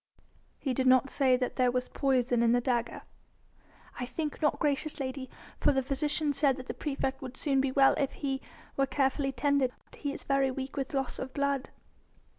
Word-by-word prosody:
"He 265 Hz, -, -2 dB
did 260 Hz, +1 st, +1 dB
not 255 Hz, +1 st, +5 dB
say 265 Hz, -3 st, +3 dB
that 250 Hz, 0 st, -3 dB
there 250 Hz, -1 st, +4 dB
was 250 Hz, 0 st, -1 dB
poison 255 Hz, -3 st, +1 dB
in 235 Hz, 0 st, +4 dB
the 245 Hz, -, +4 dB
dagger?" 240 Hz, -1 st, -1 dB, 1.0 s
"I 250 Hz, -, -3 dB
think 305 Hz, +2 st, -4 dB
not, 295 Hz, -2 st, +2 dB
gracious 295 Hz, +1 st, -1 dB
lady; 260 Hz, -1 st, -4 dB, 0.3 s
for -, -, +4 dB
the 265 Hz, -1 st, +1 dB
physician 290 Hz, +2 st, +1 dB
said 275 Hz, -1 st, +2 dB
that 260 Hz, -, -8 dB
the -, -, -4 dB
praefect 270 Hz, -2 st, -3 dB
would 255 Hz, -1 st, -7 dB
soon 275 Hz, -3 st, +2 dB
be 270 Hz, -1 st, 0 dB
well 270 Hz, 0 st, +5 dB
if 275 Hz, -, +1 dB
he 270 Hz, -1 st, -3 dB, 0.3 s
were 275 Hz, 0 st, +2 dB
carefully 270 Hz, 0 st, +1 dB
tended. 270 Hz, 0 st, +1 dB, 0.2 s
He 285 Hz, -, -3 dB
is -, -, -8 dB
very 275 Hz, -1 st, +2 dB
weak 265 Hz, +1 st, -5 dB
with 275 Hz, 0 st, -3 dB
loss 270 Hz, -2 st, -2 dB
of 260 Hz, 0 st, -5 dB
blood." 280 Hz, -1 st, 0 dB
270 Hz, 195 wpm, -30 LUFS, 255-280 Hz, 1.0 s, not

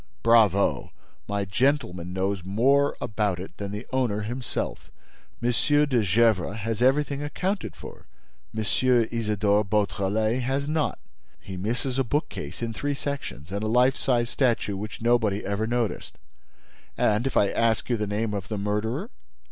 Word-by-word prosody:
"Bravo! 110 Hz, -4 st, +4 dB, 0.4 s
My 100 Hz, -1 st, -1 dB
gentleman 95 Hz, -5 st, 0 dB
knows 95 Hz, 0 st, -1 dB
more 135 Hz, +9 st, +2 dB
about 105 Hz, -4 st, -1 dB
it 95 Hz, -, -8 dB
than 100 Hz, -1 st, -4 dB
the 105 Hz, +3 st, -5 dB
owner 120 Hz, -6 st, +1 dB
himself. 120 Hz, +4 st, -4 dB, 0.5 s
M. 120 Hz, -, +3 dB
de 145 Hz, 0 st, +3 dB
Gesvres 105 Hz, -1 st, +2 dB
has 115 Hz, +1 st, -2 dB
everything 140 Hz, +2 st, +2 dB
accounted 145 Hz, -, -2 dB
for: -, -, -11 dB, 0.4 s
M. 110 Hz, -, -3 dB
Isidore 110 Hz, -3 st, +2 dB
Beautrelet 105 Hz, +3 st, 0 dB
has 135 Hz, +3 st, -1 dB
not. 155 Hz, -1 st, 0 dB, 0.4 s
He 95 Hz, -, -8 dB
misses 120 Hz, +7 st, -2 dB
a -, -, +3 dB
bookcase 110 Hz, -, -3 dB
in 115 Hz, -1 st, -2 dB
three 145 Hz, +4 st, -2 dB
sections 140 Hz, -, -5 dB
and 100 Hz, +1 st, -2 dB
a 110 Hz, -, -1 dB
life 125 Hz, +4 st, +4 dB
size 120 Hz, -2 st, 0 dB
statue 115 Hz, -6 st, +1 dB
which 105 Hz, +2 st, -6 dB
nobody 115 Hz, -4 st, +2 dB
ever 100 Hz, +3 st, -1 dB
noticed. 120 Hz, -2 st, -2 dB, 0.8 s
And, 110 Hz, +5 st, +2 dB
if 135 Hz, -, -1 dB
I 100 Hz, -, +4 dB
asked 115 Hz, -2 st, +1 dB
you 120 Hz, -, +1 dB
the 105 Hz, -2 st, -2 dB
name 105 Hz, +1 st, -1 dB
of 100 Hz, -2 st, -4 dB
the 110 Hz, -, -3 dB
murderer?" 105 Hz, +3 st, -2 dB
110 Hz, 150 wpm, -26 LUFS, 100-125 Hz, 0.8 s, Bravo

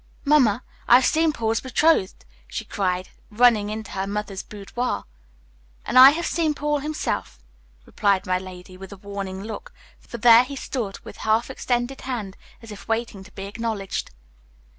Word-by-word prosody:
"Mamma, 255 Hz, -6 st, +4 dB, 0.2 s
I've 250 Hz, +2 st, +6 dB
seen 320 Hz, 0 st, +3 dB
Paul's 225 Hz, -5 st, -1 dB
betrothed!" 260 Hz, -, +1 dB, 0.2 s
she -, -, -5 dB
cried, 185 Hz, -2 st, -2 dB, 0.2 s
running 220 Hz, -2 st, +4 dB
into 215 Hz, 0 st, -6 dB
her 195 Hz, 0 st, -3 dB
mother's 200 Hz, -1 st, -4 dB
boudoir. 210 Hz, +4 st, -4 dB, 0.8 s
"And 255 Hz, -, +4 dB
I 260 Hz, +1 st, +12 dB
have 330 Hz, +4 st, -2 dB
seen 320 Hz, -3 st, 0 dB
Paul 295 Hz, 0 st, -1 dB
himself," 300 Hz, -, -3 dB, 0.5 s
replied 200 Hz, -2 st, +1 dB
my 185 Hz, 0 st, 0 dB
lady, 185 Hz, 0 st, -11 dB
with 195 Hz, +1 st, -11 dB
a 200 Hz, -, -9 dB
warning 195 Hz, -1 st, -6 dB
look, 220 Hz, 0 st, -7 dB, 0.3 s
for 235 Hz, -, -9 dB
there 235 Hz, +1 st, +7 dB
he 280 Hz, +2 st, -7 dB
stood, 235 Hz, -7 st, -4 dB
with -, -, -11 dB
half 220 Hz, +4 st, 0 dB
extended 245 Hz, +1 st, -2 dB
hand, 225 Hz, -7 st, -5 dB, 0.3 s
as 225 Hz, -, -10 dB
if 205 Hz, -, -11 dB
waiting 225 Hz, -3 st, -2 dB
to 210 Hz, -, -15 dB
be 195 Hz, -, -7 dB
acknowledged. 210 Hz, -1 st, -4 dB
220 Hz, 160 wpm, -23 LUFS, 195-255 Hz, 0.8 s, I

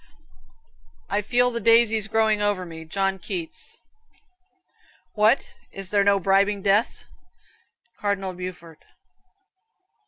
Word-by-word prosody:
"I 205 Hz, +1 st, +1 dB
feel 245 Hz, +3 st, +2 dB
the 235 Hz, -, -3 dB
daisies 230 Hz, -1 st, +4 dB
growing 220 Hz, -1 st, +1 dB
over 205 Hz, -3 st, 0 dB
me." 160 Hz, -1 st, -10 dB
John 195 Hz, +3 st, -1 dB
Keats. 175 Hz, -3 st, -7 dB, 1.4 s
"What, 215 Hz, +4 st, +2 dB, 0.2 s
is 195 Hz, -1 st, -7 dB
there 205 Hz, -1 st, +3 dB
no 200 Hz, 0 st, +3 dB
bribing 195 Hz, +1 st, +2 dB
death?" 205 Hz, +3 st, +1 dB, 0.9 s
Cardinal 195 Hz, -2 st, -2 dB
Beaufort. 175 Hz, -3 st, -9 dB
200 Hz, 100 wpm, -24 LUFS, 185-215 Hz, 1.4 s, daisies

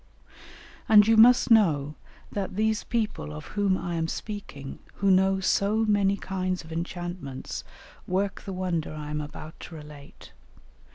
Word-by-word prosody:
And 210 Hz, -1 st, +8 dB
you 225 Hz, -, +5 dB
must 240 Hz, +2 st, +6 dB
know 155 Hz, -10 st, +4 dB, 0.4 s
that 195 Hz, -2 st, -4 dB
these 220 Hz, +1 st, +1 dB
people 215 Hz, -, -2 dB
of 75 Hz, 0 st, -8 dB
whom 200 Hz, -2 st, +2 dB
I 175 Hz, -, -4 dB
am 165 Hz, -1 st, -1 dB
speaking, 165 Hz, -9 st, -7 dB, 0.2 s
who 200 Hz, -1 st, +2 dB
know 190 Hz, +1 st, +4 dB
so 205 Hz, +3 st, +2 dB
many 200 Hz, -2 st, +2 dB
kinds 185 Hz, -1 st, -3 dB
of 160 Hz, -, -13 dB
enchantments, 170 Hz, -4 st, -5 dB, 0.4 s
work 195 Hz, +2 st, -1 dB
the 195 Hz, -, -7 dB
wonder 180 Hz, -3 st, -2 dB
I 150 Hz, -1 st, -6 dB
am 150 Hz, 0 st, -2 dB
about 150 Hz, +1 st, -9 dB
to 170 Hz, -, -9 dB
relate. 150 Hz, -2 st, -12 dB
185 Hz, 150 wpm, -27 LUFS, 155-205 Hz, 0.4 s, And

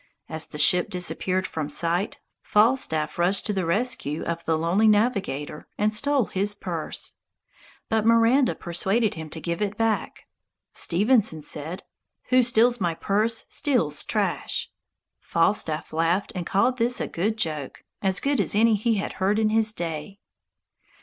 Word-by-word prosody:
As 160 Hz, 0 st, -4 dB
the 150 Hz, -, -9 dB
ship 180 Hz, +3 st, +4 dB
disappeared 185 Hz, +1 st, -1 dB
from 155 Hz, -4 st, -4 dB
sight, 170 Hz, +5 st, 0 dB, 0.2 s
Falstaff 210 Hz, -10 st, +1 dB
rushed 180 Hz, +3 st, +2 dB
to 210 Hz, -, -1 dB
the 190 Hz, -4 st, -2 dB
rescue 170 Hz, -, -1 dB
of 170 Hz, 0 st, -4 dB
the 160 Hz, -1 st, +1 dB
lonely 175 Hz, +7 st, +2 dB
navigator 200 Hz, -, 0 dB
and 215 Hz, +1 st, +1 dB
stole 280 Hz, +2 st, +1 dB
his 200 Hz, +2 st, -2 dB
purse! 175 Hz, -6 st, -5 dB, 0.7 s
But 220 Hz, -1 st, +1 dB
Miranda 230 Hz, +4 st, +4 dB
persuaded 195 Hz, +6 st, 0 dB
him 160 Hz, -1 st, -8 dB
to 160 Hz, -, -7 dB
give 170 Hz, +3 st, -4 dB
it 205 Hz, 0 st, -2 dB
back. 225 Hz, -1 st, -1 dB, 0.5 s
Stevenson 200 Hz, -, +2 dB
said, 155 Hz, +5 st, -4 dB, 0.5 s
"Who 255 Hz, 0 st, +5 dB
steals 240 Hz, -1 st, +2 dB
my 170 Hz, -2 st, 0 dB
purse 215 Hz, +6 st, 0 dB
steals 230 Hz, -, +1 dB
trash." -, -, -2 dB, 0.5 s
Falstaff 165 Hz, -3 st, 0 dB
laughed 165 Hz, +4 st, 0 dB
and 180 Hz, -3 st, -4 dB
called 250 Hz, +6 st, +1 dB
this 240 Hz, +2 st, +2 dB
a -, -, -2 dB
good 215 Hz, +6 st, -2 dB
joke, 155 Hz, -9 st, -3 dB, 0.2 s
as 190 Hz, -1 st, +1 dB
good 280 Hz, -5 st, +1 dB
as 200 Hz, -, -1 dB
any 225 Hz, +2 st, +4 dB
he 225 Hz, +2 st, +1 dB
had 200 Hz, -, -3 dB
heard 200 Hz, +3 st, +2 dB
in 220 Hz, -1 st, +2 dB
his 220 Hz, 0 st, +2 dB
day. 170 Hz, -1 st, -5 dB
195 Hz, 150 wpm, -24 LUFS, 165-225 Hz, 0.7 s, Who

